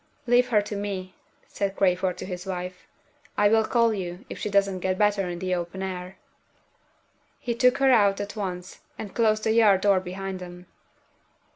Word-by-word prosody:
"Leave 245 0 +3
her 210 -3 +3
to 205 0 -6
me," 195 -2 -4 0.3
said 200 -1 -3
Crayford 185 -1 +1
to - - -6
his 180 0 -6
wife. 180 -1 -6 0.5
"I 205 0 +4
will 220 +1 +4
call 230 -1 +2
you, 185 +2 -5
if - - -6
she - - -3
doesn't 200 -2 +2
get 185 +1 -1
better 205 -2 +2
in 175 - -4
the 185 +1 -2
open 175 +2 -3
air." 185 0 -6 1.2
He 240 - -3
took 250 +2 +3
her 270 -1 +4
out 205 -5 +4
at 205 +1 -5
once, 185 -3 -5 0.2
and 205 -3 -7
closed 215 -2 +2
the 220 - +2
yard 215 -4 +5
door 200 -2 +4
behind 190 +1 -6
them. 180 0 -10
195 Hz, 180 wpm, -25 LUFS, 185-210 Hz, 1.2 s, yard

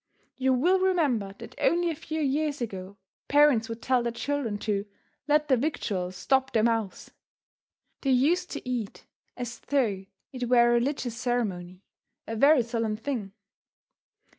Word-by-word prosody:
You 260 0 +2
will 350 +10 +3
remember 285 - +1
that - - -10
only 345 0 +2
a - - -4
few 315 +1 -4
years 295 +1 0
ago 200 -4 -6 0.3
parents 285 -6 +4
would 230 0 -6
tell 255 -1 +2
their 235 0 -1
children 240 -3 -2
to 205 -1 -1 0.4
"let 300 0 +3
their 260 - +4
victuals 195 - -2
stop 265 +7 +1
their 220 - +3
mouths." 225 -4 -1 0.9
They 275 - -1
used 315 +8 +2
to - - -7
eat 240 -5 -4 0.3
as 240 -1 -5
though 225 -9 0 0.3
it 250 -2 -4
were 240 -1 +5
a - - +4
religious 245 -1 0
ceremony 200 -7 -2 0.4
a 225 - -5
very 275 +2 +5
solemn 225 -2 -2
thing. 225 -5 -4
245 Hz, 150 wpm, -27 LUFS, 220-285 Hz, 0.9 s, were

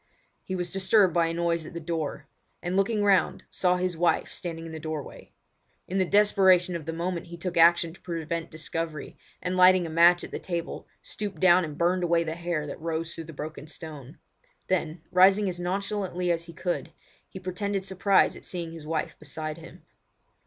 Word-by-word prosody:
He 185 - -4
was 180 -1 -3
disturbed 195 -1 +3
by 170 -1 +3
a 165 - -2
noise 170 -1 0
at - - -11
the - - -3
door, 160 -2 -3 0.4
and 175 +1 -2
looking 205 +2 +2
round, 200 -2 +3
saw 180 -1 +2
his 180 -1 -1
wife 170 +1 +1
standing 165 -2 -5
in 165 - -7
the 160 - -6
doorway. 155 -2 -7 0.6
In 190 +2 -1
the 185 - +3
desperation 190 -3 +4
of 160 -2 -6
the - - -1
moment 170 +1 -3
he 170 0 -9
took 175 +1 -4
action 170 0 +5
to 190 - -18
prevent 165 -1 -4
discovery, 160 -1 -5 0.3
and 180 0 -1
lighting 185 -1 +6
a 165 - -5
match 170 +2 +5
at - - -8
the - - -5 0.2
lamp, - - -9 0.2
stooped 200 -6 -5
down 180 +1 +6
and 150 -2 -6
burned 180 +2 +2
away 170 -1 +2
the 160 -1 -3
hair 170 -2 -2
that 145 - -7
rose 165 0 -3
through 165 - -7
the 165 - -10
broken 150 +1 -7
stone. 150 -2 -9 0.5
Then 165 -3 -1
rising 190 +1 +5
nonchalantly 185 -1 -2
as 170 0 -1
he 170 - -11
could, 175 0 -3 0.4
he 190 - -8
pretended 190 +1 -3
surprise 190 +1 +3
at - - -12
seeing 170 -2 -4
his 160 -2 -9
wife 160 0 -3
beside 155 +1 -4
him. 165 +1 -13
170 Hz, 195 wpm, -27 LUFS, 165-185 Hz, 0.6 s, lighting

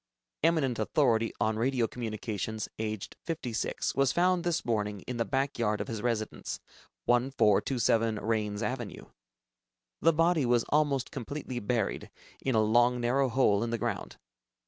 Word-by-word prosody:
eminent 150 -7 +2
authority 115 -1 +2
on 110 0 +1
Radio 125 0 +2
Communications, 110 -2 -4
aged 110 -2 -4
56, 130 -9 -2
was 135 -1 +3
found 180 +2 +2
this 170 -1 0
morning 105 -3 -1
in 125 +4 -5
the 115 - 0
back 135 +4 -1
yard 105 -2 +1
of - - -3
his 110 -2 -4
residence, 115 -3 -2 0.5
1427 120 -2 +2
Raines 105 -1 -1
Avenue. 120 -1 -4 1.0
The 165 - +6
body 165 -3 +3
was 120 -1 +3
almost 145 -3 +1
completely 130 0 -5
buried 110 -1 -1 0.3
in 130 -3 +1
a 110 - +5
long 120 +3 +4
narrow 130 +3 +2
hole 115 -4 +3
in 115 - -2
the 115 - -1
ground. - - -3
120 Hz, 145 wpm, -30 LUFS, 110-135 Hz, 1.0 s, The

